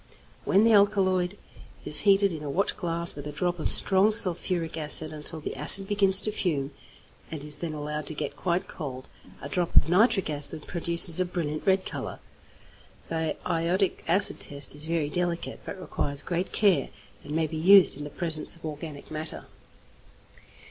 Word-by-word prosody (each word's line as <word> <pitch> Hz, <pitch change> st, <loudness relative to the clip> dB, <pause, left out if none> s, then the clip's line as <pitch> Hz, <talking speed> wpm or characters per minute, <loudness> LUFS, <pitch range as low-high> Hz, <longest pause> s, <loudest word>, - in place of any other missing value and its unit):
When 200 Hz, -, +3 dB
the 225 Hz, 0 st, +4 dB
alkaloid 195 Hz, -2 st, +2 dB, 0.5 s
is 150 Hz, 0 st, +3 dB
heated 200 Hz, -2 st, +3 dB
in 155 Hz, -, -7 dB
a 150 Hz, -, -6 dB
watchglass 170 Hz, 0 st, -1 dB
with 145 Hz, 0 st, -9 dB
a -, -, -6 dB
drop 175 Hz, +4 st, -3 dB
of -, -, -2 dB
strong 200 Hz, +2 st, +4 dB
sulphuric 175 Hz, -4 st, +1 dB
acid 155 Hz, 0 st, -1 dB
until 155 Hz, +1 st, -4 dB
the -, -, -6 dB
acid 165 Hz, +8 st, +3 dB
begins 195 Hz, -1 st, +3 dB
to 215 Hz, -, +1 dB
fume, 150 Hz, -9 st, -3 dB, 0.6 s
and 155 Hz, -3 st, -7 dB
is 150 Hz, -1 st, 0 dB
then 165 Hz, -2 st, -5 dB
allowed 150 Hz, 0 st, -6 dB
to 155 Hz, -, -5 dB
get 145 Hz, -1 st, -5 dB
quite 180 Hz, +4 st, -2 dB
cold, 130 Hz, -4 st, -8 dB, 0.3 s
a -, -, -5 dB
drop 175 Hz, +4 st, -3 dB
of -, -, +4 dB
nitric 195 Hz, +1 st, +2 dB
acid 150 Hz, +1 st, -4 dB
produces 170 Hz, 0 st, +6 dB
a 185 Hz, -, +1 dB
brilliant 160 Hz, -3 st, -5 dB
red 190 Hz, 0 st, +2 dB
colour. -, -, -6 dB, 0.9 s
The 160 Hz, -1 st, -3 dB
iodic 175 Hz, +3 st, -1 dB
acid 185 Hz, +5 st, +1 dB
test 140 Hz, -1 st, +3 dB
is 145 Hz, +2 st, 0 dB
very 165 Hz, -3 st, -1 dB
delicate, 175 Hz, -1 st, -3 dB
but 195 Hz, -, -7 dB
requires 140 Hz, -5 st, -3 dB
great 175 Hz, +1 st, -3 dB
care, 190 Hz, -10 st, +1 dB, 0.3 s
and 145 Hz, +1 st, -7 dB
may 160 Hz, 0 st, +1 dB
be 160 Hz, -, -7 dB
used 190 Hz, +4 st, +6 dB
in 145 Hz, -, -8 dB
the 145 Hz, -, -7 dB
presence 160 Hz, -1 st, 0 dB
of 165 Hz, -, -13 dB
organic 150 Hz, -1 st, -8 dB
matter. 155 Hz, 0 st, -5 dB
165 Hz, 175 wpm, -26 LUFS, 150-185 Hz, 0.9 s, produces